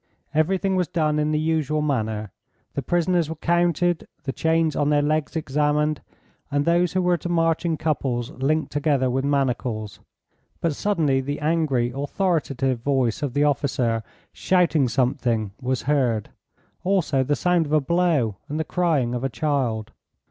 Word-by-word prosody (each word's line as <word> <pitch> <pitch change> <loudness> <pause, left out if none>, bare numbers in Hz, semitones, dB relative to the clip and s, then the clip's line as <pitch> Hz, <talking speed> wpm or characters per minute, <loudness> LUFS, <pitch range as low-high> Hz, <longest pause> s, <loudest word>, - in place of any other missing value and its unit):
Everything 190 +5 +1
was 180 -2 +1
done 155 -2 0
in 150 0 +1
the 155 - +1
usual 155 -1 0
manner. 110 -7 -2 0.4
The 140 - -2
prisoners 175 +2 +1
were 160 - -4
counted, 175 +1 +1 0.2
the 135 - -2
chains 160 0 +1
on 145 -1 +1
their 145 -1 +3
legs 155 +2 0
examined, 150 0 0 0.5
and 145 0 0
those 170 +1 +2
who 185 -1 +1
were 180 -1 +3
to 175 - -6
march 165 0 +1
in 165 -2 0
couples 135 -5 -1
linked 155 +3 -1
together 140 -3 +1
with 135 +1 0
manacles. 125 -6 -1 0.6
But 165 -3 0
suddenly 155 -10 +1
the 145 +2 -4
angry, 150 -6 +1
authoritative 140 -4 -1
voice 130 -2 0
of 145 -3 -3
the 145 - +3
officer 135 -5 +1 0.3
shouting 170 -7 +2
something 120 -4 0
was 130 -1 -1
heard, 125 -6 0 0.5
also 180 -8 +1
the 145 +3 +1
sound 175 -2 +1
of - - -7
a 155 - +5
blow 150 - +1
and 150 +2 -3
the - - +1
crying 155 -9 0
of 125 0 -3
a 135 - 0
child. 125 -6 -1
150 Hz, 160 wpm, -23 LUFS, 130-165 Hz, 0.6 s, a